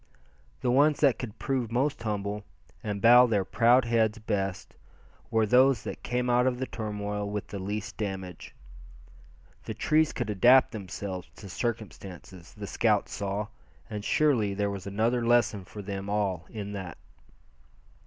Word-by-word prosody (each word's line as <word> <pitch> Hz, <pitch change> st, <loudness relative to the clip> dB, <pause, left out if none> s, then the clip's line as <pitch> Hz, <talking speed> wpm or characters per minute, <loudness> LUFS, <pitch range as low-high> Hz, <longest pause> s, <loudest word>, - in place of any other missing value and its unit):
The 125 Hz, -, +1 dB
ones 145 Hz, +3 st, +4 dB
that 140 Hz, -5 st, +4 dB
could 115 Hz, -5 st, -6 dB
prove 130 Hz, -5 st, -2 dB
most 135 Hz, +2 st, 0 dB
humble, 105 Hz, -1 st, -3 dB, 0.4 s
and 100 Hz, -2 st, -4 dB
bow 120 Hz, +2 st, +8 dB
their 100 Hz, -5 st, +1 dB
proud 120 Hz, +5 st, +4 dB
heads, 115 Hz, -1 st, +2 dB
best, 100 Hz, -3 st, -3 dB, 0.6 s
were 110 Hz, -1 st, +2 dB
those 125 Hz, +1 st, +4 dB
that -, -, -6 dB
came 125 Hz, 0 st, -1 dB
out 125 Hz, +1 st, +3 dB
of 125 Hz, -1 st, 0 dB
the 130 Hz, -, -2 dB
turmoil 105 Hz, -3 st, -4 dB
with 105 Hz, 0 st, -3 dB
the 100 Hz, -, -5 dB
least 100 Hz, +2 st, -5 dB
damage. 95 Hz, -4 st, -6 dB, 1.1 s
The -, -, -5 dB
trees 155 Hz, 0 st, +2 dB
could 120 Hz, -4 st, -3 dB
adapt 125 Hz, +6 st, +5 dB
themselves 95 Hz, -3 st, -6 dB
to 100 Hz, -, -11 dB
circumstances, 95 Hz, -, -6 dB
the 105 Hz, -1 st, -7 dB
scouts 105 Hz, 0 st, +1 dB
saw; 100 Hz, +1 st, -3 dB, 0.4 s
and 105 Hz, -1 st, -4 dB
surely 115 Hz, -8 st, +2 dB
there 100 Hz, 0 st, 0 dB
was 100 Hz, -1 st, -6 dB
another 115 Hz, +5 st, 0 dB
lesson 115 Hz, -5 st, +2 dB
for 105 Hz, +3 st, -9 dB
them 100 Hz, 0 st, -5 dB
all 100 Hz, -5 st, -1 dB
in 105 Hz, -3 st, -6 dB
that. 95 Hz, -5 st, -6 dB
105 Hz, 155 wpm, -28 LUFS, 100-120 Hz, 1.1 s, bow